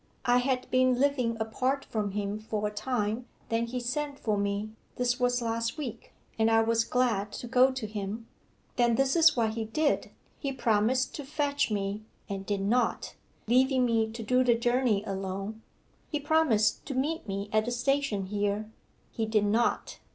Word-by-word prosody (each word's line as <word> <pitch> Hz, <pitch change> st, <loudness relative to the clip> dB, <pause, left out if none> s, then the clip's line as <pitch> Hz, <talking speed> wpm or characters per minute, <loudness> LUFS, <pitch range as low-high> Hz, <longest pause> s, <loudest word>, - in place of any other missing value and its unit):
I 245 Hz, 0 st, +4 dB
had 255 Hz, 0 st, -1 dB
been 255 Hz, -1 st, +3 dB
living 255 Hz, -5 st, +1 dB
apart 255 Hz, +5 st, -1 dB
from 210 Hz, -3 st, -2 dB
him 205 Hz, 0 st, -2 dB
for 215 Hz, -1 st, -2 dB
a -, -, -4 dB
time 215 Hz, +1 st, -2 dB, 0.2 s
then 230 Hz, +1 st, 0 dB
he 250 Hz, +2 st, -3 dB
sent 280 Hz, +4 st, -3 dB
for 215 Hz, -5 st, -1 dB
me 200 Hz, +1 st, -1 dB, 0.2 s
(this 245 Hz, 0 st, 0 dB
was 245 Hz, 0 st, +1 dB
last 230 Hz, +2 st, -1 dB
week) 270 Hz, -8 st, -6 dB, 0.3 s
and 220 Hz, 0 st, +4 dB
I 225 Hz, 0 st, +5 dB
was 230 Hz, 0 st, +2 dB
glad 225 Hz, -5 st, 0 dB
to 245 Hz, -, -6 dB
go 255 Hz, +2 st, +5 dB
to 260 Hz, -3 st, -4 dB
him. 210 Hz, +1 st, -5 dB, 0.5 s
Then 240 Hz, -2 st, +3 dB
this 270 Hz, +2 st, +2 dB
is 325 Hz, -4 st, +6 dB
what 225 Hz, -2 st, +2 dB
he 225 Hz, 0 st, -2 dB
did. 290 Hz, +7 st, 0 dB, 0.3 s
He 275 Hz, -2 st, -2 dB
promised 240 Hz, +1 st, +1 dB
to 290 Hz, -, -5 dB
fetch 285 Hz, -1 st, 0 dB
me, 200 Hz, 0 st, -2 dB, 0.3 s
and 195 Hz, -1 st, -5 dB
did 200 Hz, -1 st, -1 dB
not 230 Hz, +4 st, 0 dB, 0.3 s
leaving 255 Hz, +2 st, +4 dB
me 225 Hz, -2 st, +1 dB
to 230 Hz, 0 st, -6 dB
do 255 Hz, +4 st, +3 dB
the 240 Hz, -2 st, +4 dB
journey 240 Hz, -3 st, +1 dB
alone. 195 Hz, +2 st, -4 dB, 0.5 s
He 300 Hz, -, -1 dB
promised 290 Hz, -9 st, +2 dB
to 275 Hz, -, -4 dB
meet 310 Hz, +4 st, -1 dB
me 200 Hz, +1 st, -3 dB
at 215 Hz, 0 st, +3 dB
the 245 Hz, -, -2 dB
station 250 Hz, -4 st, 0 dB
here 205 Hz, +2 st, -2 dB, 0.4 s
he 225 Hz, -1 st, -2 dB
did 215 Hz, -1 st, +2 dB
not. 225 Hz, +4 st, 0 dB
230 Hz, 180 wpm, -29 LUFS, 210-255 Hz, 0.5 s, is